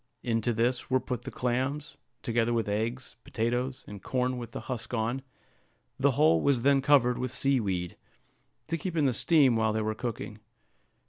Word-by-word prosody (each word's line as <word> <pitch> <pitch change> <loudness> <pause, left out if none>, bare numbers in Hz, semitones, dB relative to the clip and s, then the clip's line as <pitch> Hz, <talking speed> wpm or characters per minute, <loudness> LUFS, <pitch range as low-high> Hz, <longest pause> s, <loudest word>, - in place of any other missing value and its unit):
Into 115 0 0
this 120 +2 0
were 130 0 +3
put 125 -2 -4
the - - -4
clams, 130 +4 -2 0.3
together 120 0 +1
with 115 -2 0
eggs, 115 +5 -3
potatoes, 125 +3 -2
and 100 -2 -9
corn 125 +2 -1
with 120 -2 -7
the - - -6
husk 125 -1 -5
on; 115 +4 -1 0.8
the - - +3
whole 80 +1 +4
was 135 -4 +2
then 140 0 +4
covered 130 -4 +4
with 130 0 -2
sea 135 +2 +1
weed, 90 -5 -2 0.7
to 165 +1 -2
keep 170 +1 -4
in 150 - +3
the 130 - +2
steam 140 -2 +4
while 110 -1 +1
they 110 - 0
were 110 0 -1
cooking. 110 -2 -5
120 Hz, 180 wpm, -29 LUFS, 115-130 Hz, 0.8 s, whole